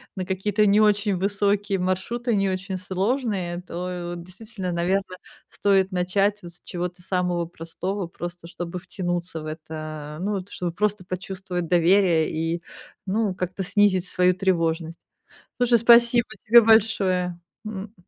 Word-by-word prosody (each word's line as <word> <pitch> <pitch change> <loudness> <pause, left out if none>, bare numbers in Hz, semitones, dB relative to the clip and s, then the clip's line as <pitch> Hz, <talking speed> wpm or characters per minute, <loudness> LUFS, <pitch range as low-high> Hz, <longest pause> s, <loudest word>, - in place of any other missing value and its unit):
на 185 -2 -3
какие-то 200 +3 +1
не 205 +1 +5
очень 205 -1 +3
высокие 200 +1 0
маршруты, 190 +7 -1
не 195 -1 +2
очень 190 +1 -3
сложные, 190 -2 -1
то 175 0 -5
вот 170 - -8
действительно, 190 0 -7
наверно, 185 +2 -1 0.3
стоит 195 -1 +2
начать 195 +3 +1
вот 175 - -10
с 175 - -18
чего-то 180 0 -5
самого 180 -2 0
простого, 175 +3 -5
просто 175 0 -8
чтобы 175 0 -6
втянуться 175 -2 -4
в - - -8
это. 155 -1 -7
Э, 180 - -5
ну, 205 - 0
вот 195 -1 -4
чтобы 175 -2 -3
просто 205 +1 -1
почувствовать 185 -1 -4
доверие 175 -1 +3
и, 165 +2 -2 0.4
ну, 200 -1 0
как-то 185 +1 -3
снизить 190 -1 +2
свою 180 0 +3
тревожность. 165 -3 0 0.6
Слушай, 245 -1 +4
спасибо 235 +1 +5 0.2
тебе 235 +2 +9
большое, 195 -5 +3 0.3
м. 205 -1 -6
185 Hz, 145 wpm, -24 LUFS, 175-205 Hz, 0.6 s, тебе